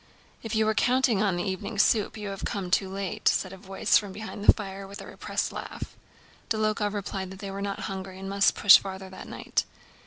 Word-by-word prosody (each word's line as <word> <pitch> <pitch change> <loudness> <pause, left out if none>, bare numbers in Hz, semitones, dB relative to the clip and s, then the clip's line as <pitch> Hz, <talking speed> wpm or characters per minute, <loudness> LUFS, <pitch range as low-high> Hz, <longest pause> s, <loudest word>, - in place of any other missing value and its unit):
"If 225 0 -4
you 220 0 +3
were 220 - +2
counting 245 -1 +3
on 200 -4 +2
the 175 - -1
evening 190 +3 -4
soup, 215 +1 +3
you 210 -1 -5
have 195 -1 -6
come 190 -3 -3
too 190 +1 +2
late," 195 -1 -3
said 185 0 +2
a - - -9
voice 195 0 +2
from 205 -2 -7
behind 210 +1 -7
the - - +9
fire 195 -2 -7
with 200 +2 -9
a - - -8
repressed - - -3
laugh. - - -7 0.5
Dólokhov 215 -1 0
replied 195 -2 -4
that 190 - -9
they 195 0 -6
were 195 +1 -5
not 200 0 -3
hungry 190 -1 -5
and 190 0 -7
must 200 0 +3
push 200 - +9
on - - -8
farther 190 -1 -7
that 190 - -9
night. - - -1
200 Hz, 225 wpm, -27 LUFS, 190-210 Hz, 0.5 s, the